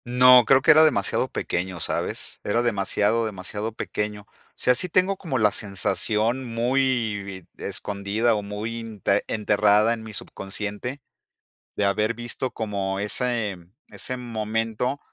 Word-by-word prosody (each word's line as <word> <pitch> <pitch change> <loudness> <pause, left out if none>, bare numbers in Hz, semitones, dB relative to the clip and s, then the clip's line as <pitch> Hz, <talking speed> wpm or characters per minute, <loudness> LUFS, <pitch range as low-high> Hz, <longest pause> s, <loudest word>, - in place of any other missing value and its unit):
No, 125 0 +7
creo 135 0 +4
que - - +7
era 155 +1 +8
demasiado 155 -5 +2
pequeño, 90 0 -3
¿sabes? - - -1
Era 115 +4 +1
demasiado, 110 0 +1
demasiado 105 +2 -5
pequeño. 105 -1 -4
O - - -36 0.2
sea, 125 - +3
sí 180 +9 0
tengo 185 +3 +2
como 165 -8 -3
la 105 -3 +3
sensación 105 +5 0
muy 120 -2 0
bi 95 -3 -9 0.2
escondida, 105 +3 -1
o 105 - -1
muy 105 +3 -5
inte 105 -3 -1
enterrada 105 +1 +3
en 115 - -6
mi 110 -1 -9
subconsciente 105 +7 -5 0.8
de 105 - +1
haber 105 +3 +1
visto 120 +2 -3
como 100 -3 -3
ese 105 0 -1 0.3
ese 130 - -5
momento 115 +2 -2
110 Hz, 140 wpm, -24 LUFS, 105-125 Hz, 0.8 s, era